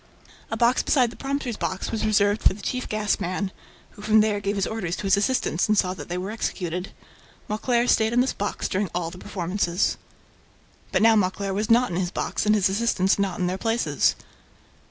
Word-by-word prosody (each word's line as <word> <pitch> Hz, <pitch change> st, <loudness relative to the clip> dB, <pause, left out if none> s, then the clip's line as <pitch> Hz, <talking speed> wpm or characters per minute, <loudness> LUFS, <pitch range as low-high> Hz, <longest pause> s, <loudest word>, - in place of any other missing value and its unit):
A 225 Hz, -, -3 dB
box 240 Hz, +2 st, +3 dB
beside 250 Hz, -5 st, +2 dB
the -, -, -12 dB
prompter's 270 Hz, -4 st, -3 dB
box 190 Hz, 0 st, -3 dB
was 225 Hz, -, -2 dB
reserved 205 Hz, 0 st, +2 dB
for -, -, +3 dB
the 205 Hz, -, -11 dB
chief 255 Hz, 0 st, -3 dB
gas 215 Hz, -1 st, 0 dB
man, 185 Hz, +2 st, -2 dB, 0.4 s
who -, -, -14 dB
from 215 Hz, +1 st, +4 dB
there 210 Hz, -1 st, +1 dB
gave 200 Hz, 0 st, -2 dB
his 195 Hz, -1 st, 0 dB
orders 190 Hz, -6 st, -3 dB
to -, -, -7 dB
his 195 Hz, 0 st, +4 dB
assistants 200 Hz, -5 st, +1 dB
and 215 Hz, 0 st, +2 dB
saw 185 Hz, -1 st, +2 dB
that 160 Hz, -4 st, -9 dB
they 175 Hz, -, -2 dB
were 190 Hz, +3 st, -4 dB
executed. 180 Hz, -4 st, -3 dB, 0.6 s
Mauclair 235 Hz, +3 st, +1 dB
stayed 220 Hz, -1 st, +3 dB
in 240 Hz, -, +2 dB
this 255 Hz, +2 st, +2 dB
box 205 Hz, -, -3 dB
during 190 Hz, 0 st, -1 dB
all 170 Hz, -2 st, -2 dB
the 180 Hz, -, -11 dB
performances. 180 Hz, -1 st, -1 dB, 0.9 s
But -, -, +2 dB
now 225 Hz, 0 st, +6 dB
Mauclair 195 Hz, 0 st, 0 dB
was 210 Hz, +3 st, -2 dB
not 240 Hz, -1 st, +4 dB
in 170 Hz, -, -2 dB
his 180 Hz, -1 st, -1 dB
box 200 Hz, -, -2 dB
and 210 Hz, -, +5 dB
his 205 Hz, -1 st, +3 dB
assistants 195 Hz, -2 st, +1 dB
not 195 Hz, -3 st, 0 dB
in 180 Hz, -, 0 dB
their 185 Hz, +2 st, -2 dB
places. 230 Hz, +1 st, +1 dB
205 Hz, 210 wpm, -24 LUFS, 185-225 Hz, 0.9 s, now